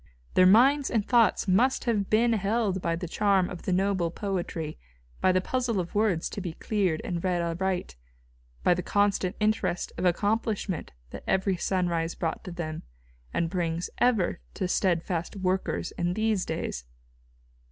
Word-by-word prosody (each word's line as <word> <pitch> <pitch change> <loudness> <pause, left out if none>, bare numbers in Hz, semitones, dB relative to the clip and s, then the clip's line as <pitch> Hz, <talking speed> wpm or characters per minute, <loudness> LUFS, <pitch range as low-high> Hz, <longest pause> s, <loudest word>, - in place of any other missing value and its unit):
Their 185 - +6
minds 265 +8 +5
and 220 -4 0
thoughts 235 -3 +3
must 240 +8 +3
have 210 -5 0
been 230 +2 +3
held 205 -2 0
by 170 -1 0
the 175 +1 -5
charm 195 0 +2
of 180 - -7
the - - -2
noble 190 -2 +1
poetry, 170 -5 -4 0.4
by 185 - +4
the 185 0 +2
puzzle 245 -1 -1
of 175 -1 -4
words 205 -6 +1
to 200 - -5
be 175 -3 -4
cleared 185 -5 -1
and 175 -2 -3
read 180 -2 +1
aright, 175 - -2 0.7
by - - +5
the 180 - -2
constant 200 -2 +1
interest 215 -4 0
of - - -1
accomplishment 205 0 0 0.2
that - - -8
every 190 0 +1
sunrise 175 -2 -1
brought 165 -1 -3
to 185 - -6
them, 160 -2 -5 0.5
and 165 -1 -1
brings 170 -2 -2
ever 230 -8 +2 0.2
to 185 - -1
steadfast 175 -1 0
workers 190 -1 -1
in 175 +1 0
these 220 -3 +1
days. 160 - -3
185 Hz, 160 wpm, -27 LUFS, 175-210 Hz, 0.7 s, Their